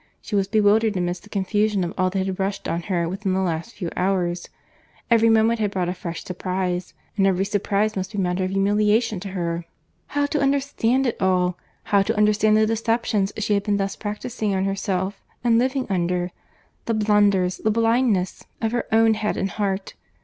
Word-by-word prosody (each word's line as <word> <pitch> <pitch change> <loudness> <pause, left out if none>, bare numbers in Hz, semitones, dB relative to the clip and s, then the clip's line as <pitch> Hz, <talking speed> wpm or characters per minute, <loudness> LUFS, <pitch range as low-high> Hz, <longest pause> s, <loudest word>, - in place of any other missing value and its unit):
—She 215 - -5
was 195 -1 +2
bewildered 215 0 +3
amidst 175 0 -2
the 210 - -17
confusion 205 0 0
of 175 +2 -3
all 185 0 +1
that 190 0 -1
had 190 -1 -4
rushed 195 +1 -2
on 170 - -1
her 170 -3 +1
within 190 +2 -2
the 190 - +1
last 170 +3 -2
few 175 -4 -4
hours. 180 -2 -1 0.6
Every 230 -1 +5
moment 225 +1 +3
had 210 -2 +1
brought 185 -3 -1
a - - -1
fresh 170 -2 -6
surprize; 180 0 -3 0.2
and 195 -1 +4
every 190 0 +1
surprize 205 +1 0
must 190 +1 -3
be 210 - -6
matter 180 -1 0
of 185 - -1
humiliation 210 +2 +2
to 200 - -7
her.—How 170 +10 -4
to 290 +1 -1
understand 275 -2 +1
it 240 - -2
all! 180 -1 +2 0.3
How 200 -1 +3
to 215 +3 -1
understand 210 0 +4
the 215 - +4
deceptions 225 -2 0
she 215 -1 0
had 200 - +2
been 205 0 0
thus 195 0 -2
practising 210 0 -3
on 190 0 0
herself, 195 0 -2 0.2
and 230 -1 +4
living 260 +1 0
under!—The 180 +4 -3
blunders, 205 -4 +3
the 220 - 0
blindness 225 -3 +1 0.2
of 225 -1 -1
her 240 0 -2
own 225 0 +5
head 215 -1 -2
and 195 0 -1
heart! 195 -1 -2
200 Hz, 185 wpm, -23 LUFS, 185-220 Hz, 0.6 s, Every